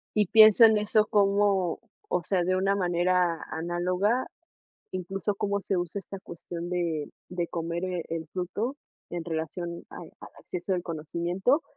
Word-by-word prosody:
Y 210 - +4
pienso 220 +2 +8
en 220 -1 +5
eso 210 +1 +3
como, 200 -3 +2 0.3
o 180 -1 0
sea, 180 -1 +1
de 185 +1 +1
una 195 +1 +2
manera 180 -2 +1
análoga, 180 +8 0 0.7
incluso 190 +2 -2
cómo 200 0 -1
se 195 -1 -1
usa 175 +3 -2
esta 195 0 -8
cuestión 170 0 -7
de 165 -4 -1 0.2
de 175 -1 -2
comer, 170 +1 -3
eh, 180 -2 -2
el 160 -1 -4
fruto, 205 - -3 0.3
en 175 -2 -4
relación 170 +1 -4
a - - -10
al - - -12
acceso 185 +1 -3
al 175 - -2
conocimiento, 175 - 0
180 Hz, 155 wpm, -27 LUFS, 170-200 Hz, 0.7 s, pienso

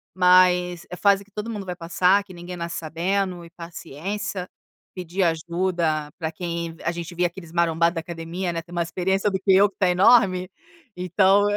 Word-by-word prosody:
mas 180 -1 +4
é 180 - -6
fase 200 +1 +3
que 205 - -28
todo 210 +2 -5
mundo 205 -3 -5
vai 180 - -4
passar, 180 +3 +2
que 190 -2 -14
ninguém 175 +1 -8
nasce 170 0 -4
sabendo 175 +2 -2
e - - -13
paciência, 180 +3 -6 0.4
pedir 180 +1 -2
ajuda 165 -2 0
para 160 -1 -3
quem 170 -1 -4
a - - 0
gente 170 0 -7
via 175 0 +2
aqueles 170 -1 -11
marombado 170 0 +2
da 165 - -2
academia, 170 +2 -4
né, 165 -1 -3
tem 175 +1 -12
mais 170 -1 -1
experiência 190 +3 0
do 190 - -1
que 190 0 +3
eu 200 +2 +6
que 195 - -29
tá 185 - +2
enorme, 185 -1 +4 0.5
então: 190 +3 +3
180 Hz, 185 wpm, -24 LUFS, 170-190 Hz, 0.5 s, eu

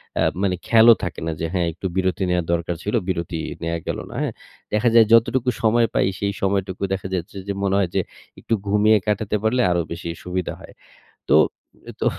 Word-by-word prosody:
অ্যা - - +1 0.2
মানে 95 -2 +1
খেয়ালও 115 0 +7
থাকে 90 - -4
না 80 - 0
যে 80 - 0
হ্যাঁ, 90 -2 +1
একটু 90 - -10
বিরতি 95 0 0
নেওয়ার 90 -2 +1
দরকার 85 0 -1
ছিল, 105 +4 -1
বিরতি 85 -3 -2 0.2
নেওয়া 85 0 -2
গেল - - -2
না - - -9
হ্যাঁ? - - -2 0.4
দেখা 105 +3 +3
যায় 115 - +8
যতটুকু 125 +2 +4
সময় 115 +1 +4
পাই - - +3
সেই 100 0 -1
সময়টুকু 95 -1 -1
দেখা 95 0 -3
যাচ্ছে 90 +2 -5
যে, 100 - -1
মনে 100 0 +1
হয় 95 -3 +1
যে 95 - +3 0.4
একটু - - -3
ঘুমিয়ে 105 +2 +4
কাটাতে 105 0 0
পারলে 125 +3 +2
আরো 85 0 +2
বেশি 85 0 -5
সুবিধা 90 0 -3
হয়। - - -13 0.6
তো - - +4 0.7
তো - - -1
95 Hz, 195 wpm, -22 LUFS, 90-110 Hz, 0.7 s, যায়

